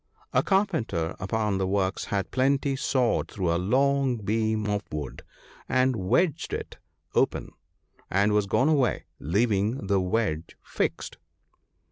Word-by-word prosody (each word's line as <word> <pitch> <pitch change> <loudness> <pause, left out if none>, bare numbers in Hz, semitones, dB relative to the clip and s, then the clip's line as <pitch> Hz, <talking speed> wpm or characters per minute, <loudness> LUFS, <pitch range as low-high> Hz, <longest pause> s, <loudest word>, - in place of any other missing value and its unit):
A - - +4
carpenter 160 - 0
upon 100 +1 -1
the 95 - 0
works 95 0 0
had 100 -2 -2
partly 135 +1 +2
sawed 130 -2 +1
through 90 -5 -1
a 85 - 0
long 135 +4 +2
beam 110 +1 0
of 105 -1 0
wood, 75 -3 -5 0.5
and 130 0 +3
wedged 120 - +1
it - - -5 0.3
open, - - +1 0.6
and 100 +2 +2
was 105 -1 +2
gone 130 +7 +2
away, 140 -6 +2
leaving 105 - 0
the 100 0 +2
wedge 90 -4 -1
fixed. - - -3
105 Hz, 130 wpm, -27 LUFS, 95-130 Hz, 0.6 s, A